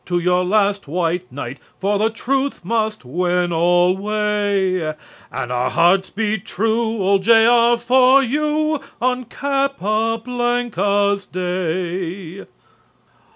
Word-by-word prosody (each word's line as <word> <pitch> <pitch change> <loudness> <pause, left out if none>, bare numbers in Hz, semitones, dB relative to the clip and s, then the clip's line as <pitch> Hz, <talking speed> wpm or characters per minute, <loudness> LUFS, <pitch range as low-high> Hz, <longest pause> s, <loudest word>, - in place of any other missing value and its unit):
To 175 0 0
your 180 +1 +1
last 200 -1 +1
white 175 +3 -2
knight, 130 -1 -7 0.2
For 200 +1 0
the 220 +1 +2
truth 265 -1 -2
must 220 - -2
win 175 +5 0
alway, 190 0 +1 0.4
And 125 -1 -4
our 125 0 0
hearts 185 +3 +2
beat 215 -2 -2
true 220 +1 -1
Old 195 +1 +2
"J.R." 235 +2 +5
for 255 +3 +4
you 300 +3 0 0.2
On 250 +1 -1
Capa 230 -5 -1
blanca's 205 -5 0
Day." 180 0 -4
200 Hz, 110 wpm, -19 LUFS, 180-235 Hz, 0.4 s, J.R